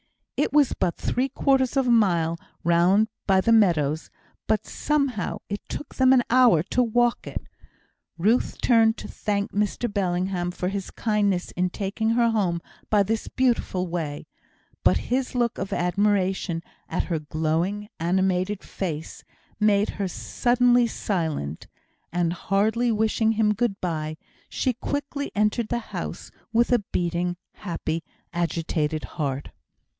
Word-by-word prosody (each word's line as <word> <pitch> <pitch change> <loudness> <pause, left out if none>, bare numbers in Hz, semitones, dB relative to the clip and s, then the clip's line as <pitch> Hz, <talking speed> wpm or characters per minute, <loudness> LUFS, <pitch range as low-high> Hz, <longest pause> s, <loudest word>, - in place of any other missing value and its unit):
It - - +1
was 290 -3 +4
but 175 - -1
three 260 +2 0
quarters 265 0 +2
of 270 - +3
a 245 - +3
mile 170 -7 +3 0.2
round 180 +6 +4 0.2
by 190 -1 +4
the 230 - +2
meadows, 160 -9 +3 0.4
but 215 0 +1
somehow 275 -9 -1
it 205 0 -3
took 295 - -6
them 260 -1 +4
an 255 -2 +5
hour 245 -11 +6
to 250 - +1
walk 240 0 +1
it. - - -5 0.7
Ruth 215 +8 +1
turned 225 -2 +4
to - - -7
thank 200 -1 -2
Mr 210 +2 -1
Bellingham 180 -1 0
for 180 0 -2
his 195 -1 -4
kindness 205 -5 0
in 180 +1 0
taking 205 +4 -2
her 235 0 +3
home 185 -6 +1 0.3
by 210 -2 +4
this 220 +2 -2
beautiful 235 -7 0
way, 165 -4 -4 0.6
but - - +5 0.2
his 260 0 -1
look 240 -2 0
of 195 - -4
admiration 190 -2 +1 0.3
at - - 0
her 165 -3 -2
glowing, 160 +7 -1
animated 185 +3 0
face, 160 -5 -5 0.4
made 210 -1 +3
her 195 - +1
suddenly 245 +5 +2
silent; 160 - -3 0.4
and, 175 -1 +1
hardly 220 +6 +1
wishing 220 +1 +2
him 210 -1 +2
good 210 -2 -1
bye, 155 -3 -3 0.3
she 255 - 0
quickly 285 +3 -3
entered 210 +2 +1
the 235 -1 -3
house - - -5 0.2
with 235 +2 +3
a 245 - +5
beating, 175 0 -1 0.2
happy, 165 -3 -3 0.3
agitated 165 -2 -1
heart. 140 -2 -4
200 Hz, 140 wpm, -25 LUFS, 175-230 Hz, 0.7 s, hour